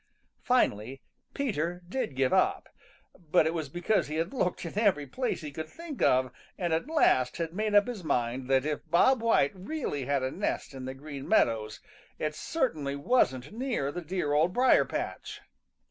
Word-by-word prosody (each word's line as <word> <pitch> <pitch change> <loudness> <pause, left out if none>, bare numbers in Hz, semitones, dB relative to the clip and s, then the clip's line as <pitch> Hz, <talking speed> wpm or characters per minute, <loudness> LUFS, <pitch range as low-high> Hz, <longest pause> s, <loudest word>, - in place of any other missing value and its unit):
Finally 135 - +1 0.4
Peter 180 - -2
did 190 - -3
give 130 -1 +1
up, - - +2 0.5
but 165 -1 +2
it 160 - 0
was 160 -4 -3
because 175 +7 0
he 155 - -4
had 165 +6 -2
looked 180 -9 -1
in 170 - -6
every 195 -10 +2
place 250 - -2
he 150 -2 -6
could 160 +2 -6
think 330 - -8
of 130 -1 +3 0.3
and 175 -3 -1
at 160 - 0
last 130 - +3
had 165 -1 -3
made 210 +2 -1
up 205 - +7
his 240 -7 -6
mind 125 -3 -1
that 135 0 +3
if 150 -1 -1
Bob 225 +9 +4
White 225 -11 +3
really 190 - -4
had 140 -1 0
a 130 - -1
nest 190 -5 -3
in 130 -1 -7
the 130 0 -5
Green 140 0 -8
Meadows 110 -2 +2 0.4
it 155 0 -2
certainly 155 - -2
wasn't 140 - +1
near 230 - -2
the 175 - -5
dear 170 -3 -2
Old 160 +5 +3
Briar 255 +4 +5
patch. - - -5
160 Hz, 180 wpm, -29 LUFS, 135-210 Hz, 0.5 s, up